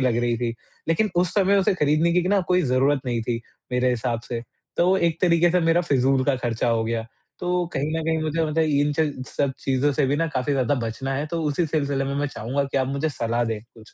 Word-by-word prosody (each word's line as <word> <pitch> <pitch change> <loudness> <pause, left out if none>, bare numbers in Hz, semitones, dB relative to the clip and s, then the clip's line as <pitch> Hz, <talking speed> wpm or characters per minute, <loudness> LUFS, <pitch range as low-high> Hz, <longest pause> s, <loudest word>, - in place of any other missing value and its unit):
लग 125 -3 +2
रही 120 0 +1
थी। 115 -1 -2 0.3
लेकिन 205 +6 +2
उस 175 -1 +2
समय 200 0 +4
उसे 195 0 +2
खरीदने 155 +1 +2
की 180 - +3
क - - -3
ना 200 - +4
कोई 180 0 +3
ज़रूरत 135 +2 +2
नहीं 120 -2 -1
थी 115 0 -2 0.3
मेरे 125 0 +2
हिसाब 120 -1 -1
से, 120 -1 -3 0.4
तो 180 +2 +4
एक 170 -3 0
तरीके 170 -1 +4
से 180 +1 +2
मेरा 170 +1 +4
फिज़ूल 130 -1 +3
का 140 -2 +2
खर्चा 120 -1 -1
हो 115 -1 +1
गया, 115 0 -2 0.3
तो 180 0 0
कहीं 145 +3 -1
न - - -2
कहीं 160 0 0
मुझे 155 +1 0
मतलब 160 +1 +1
इन 145 -1 +2
च 155 -2 +3 0.2
सब 140 -2 -1
चीज़ों 135 +2 +1
से 135 - +1
भी 140 - +1
ना, 165 +2 +1
काफ़ी 130 +3 0
ज़्यादा 135 0 +1
बचना 135 +4 -3
है, 145 +3 -2
तो 165 +1 -3
उसी 155 +3 0
सिलसिले 140 -3 -1
में 135 +1 -3
मैं 145 +1 0
चाहूँगा 135 +1 -2
कि 140 - -4
आप 130 - +1
मुझे 140 +3 -1
सलाह 120 +1 0
दें 110 -2 -3
कुछ। 115 -2 -18
140 Hz, 245 wpm, -24 LUFS, 125-165 Hz, 0.4 s, समय